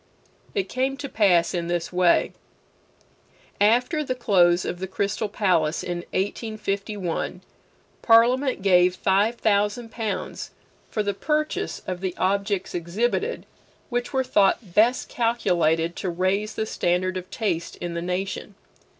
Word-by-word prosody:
It 395 - 0
came 265 +1 -1
to 285 0 -5
pass 190 -9 +3
in 170 -2 -2
this 175 0 -2
way: 180 -1 +3 1.3
After 250 +9 +3
the 255 -3 -2
close 180 -7 +3
of 175 - -4
the 190 - -4
Crystal 200 +3 -2
Palace 175 -7 +1
in 175 -1 -3
1851, 200 -2 -3 0.6
Parliament 245 +1 +4
gave 180 -2 +4
five 200 +5 +2
thousand 215 +1 0
pounds 215 -4 -4 0.4
for 215 - -1
the 200 0 -1
purchase 305 +8 -2
of 185 -1 -4
the 185 -2 -3
objects 200 0 0
exhibited 225 - -1 0.5
which 245 0 -2
were 265 0 +1
thought 205 -5 +2
best 230 +6 +3
calculated 170 -8 +1
to 185 - -2
raise 190 +5 -1
the 220 - -1
standard 185 -2 0
of 185 0 -6
taste 175 -7 -2
in 175 -1 -5
the 170 - -3
nation. 190 +3 -4
200 Hz, 135 wpm, -24 LUFS, 180-230 Hz, 1.3 s, Parliament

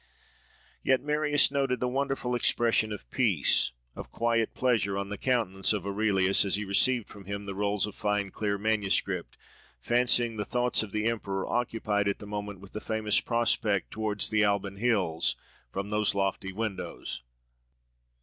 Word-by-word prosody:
Yet 130 -1 +2
Marius 150 -1 +2
noted 135 -3 0
the 125 - 0
wonderful 135 -1 -1
expression 115 -2 +2
of 105 -12 -7
peace, - - +2 0.2
of - - -8
quiet 115 -1 0
pleasure, 110 -6 +1
on 100 0 -3
the 105 - -4
countenance 110 -7 +1
of 100 -3 -3
Aurelius, 100 -2 +2
as 100 - +1
he 105 +1 -3
received 120 +4 +2
from 100 -2 -12
him 100 +1 -5
the 100 -1 -5
rolls 100 0 0
of 105 - -7
fine 105 -1 -1
clear 100 -1 -1
manuscript, 105 -1 0 0.4
fancying 120 -1 +2
the 105 - -1
thoughts 125 +3 +1
of 110 -3 -6
the 105 +1 -1
emperor 100 -4 -1
occupied 110 -4 0
at 100 - 0
the - - -10
moment 105 -2 -5
with 100 - -13
the 105 - -6
famous 110 -2 +1
prospect 115 -4 0
towards 110 -2 -1
the 110 0 +3
Alban 100 -1 0
hills, 100 -8 +1 0.4
from 100 +5 -4
those 105 -1 +1
lofty 95 0 -1
windows. 105 - -4
105 Hz, 160 wpm, -28 LUFS, 100-120 Hz, 0.4 s, the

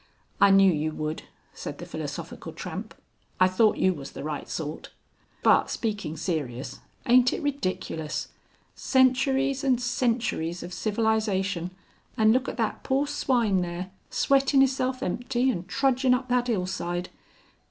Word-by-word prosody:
"I 200 - +8
knew 195 -1 +6
you 155 0 -1
would," 155 0 -4 0.3
said - - -7
the - - -8
Philosophical - - -6
Tramp. - - -7 0.4
"I 185 - +6
thought 210 +4 +3
you 185 - +3
was 140 -4 -9
the - - -7
right 150 -1 -5
sort. 155 -1 -5 0.5
But - - +4
speaking 210 -8 -3
serious, 145 -7 -3 0.3
aint 250 +1 +5
it - - -4
ridiculous? 185 - -3 0.4
centuries 265 +1 +2
and 260 -3 +3
centuries 230 -9 -1
of 175 +1 -7
civilization, 205 -5 0 0.5
and 220 0 +5
look 255 +2 +1
at - - -6
that 225 -3 -1
poor 270 +2 +1
swine 240 -9 +1
there, 175 +1 -4 0.2
sweatin' 275 0 +3
'isself 260 -1 0
empty 245 +6 0
and 175 -5 -5
trudging 260 -1 +2
up 255 0 -4
that 250 0 +1
'ill 195 -6 0
side. 175 -1 -3
220 Hz, 140 wpm, -26 LUFS, 175-255 Hz, 0.5 s, I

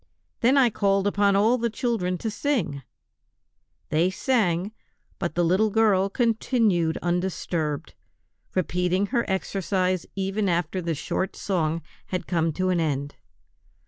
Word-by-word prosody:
Then 260 +3 +4
I 250 -4 +5
called 195 -1 +1
upon 200 0 +3
all 225 +5 +3
the 235 0 0
children 215 -6 -1
to 220 +4 -3
sing; 205 - -1 1.1
they 165 +4 +2
sang, 190 -4 0 0.5
but 175 -3 -3
the 175 0 +2
little 190 +6 +3
girl 200 -3 +3
continued 220 -7 +1
undisturbed, 175 -4 -2 0.6
repeating 180 +1 +1
her 235 -3 +1
exercise 185 -1 -1
even 195 +1 -1
after 175 +1 0
the 165 -2 -2
short 185 +6 -2
song 165 -4 -1 0.2
had 185 - -3
come 165 -2 +1
to 185 +3 0
an 180 -2 +2
end. 145 -3 -1
185 Hz, 130 wpm, -25 LUFS, 175-210 Hz, 1.1 s, I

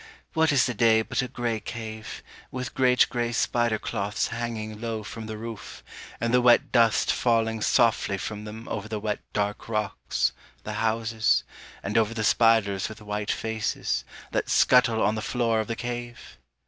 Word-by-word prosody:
What 160 0 +3
is 140 -3 +4
the 125 - -1
day 110 0 +4
But - - -1
a 125 - -3
grey 120 -3 -2
cave, 110 0 -7 0.3
with 125 0 -5
great 125 -1 +4
grey 120 -1 -2
spider 120 -1 +1
cloths 105 +1 -2
hanging 110 -2 -4
Low 115 -2 -3
from 110 +1 -7
the 110 -1 -5
roof, 115 -1 -8 0.4
and 115 +1 -1
the 125 - +5
wet 125 +3 +5
dust 115 -3 +4
falling 115 -2 +1
softly 115 -4 +2
from 105 +2 -5
them 110 +2 -9
Over 105 +1 -4
the 110 -1 -3
wet 105 0 -2
dark 105 +1 -2
rocks, 100 - -1 0.3
the 110 - -5
houses, 110 - +1 0.4
and 105 +3 +1
over 115 +1 0
The 110 - -1
spiders 110 -3 +3
with 110 0 -10
white 105 -1 -4
faces, 110 -1 -1 0.3
that - - -1
scuttle 115 -3 +4
on 105 - +3
the 110 - -3
floor 115 -1 0
of 110 - -2
the 115 - -2
cave! 120 - -6
110 Hz, 175 wpm, -26 LUFS, 110-120 Hz, 0.4 s, the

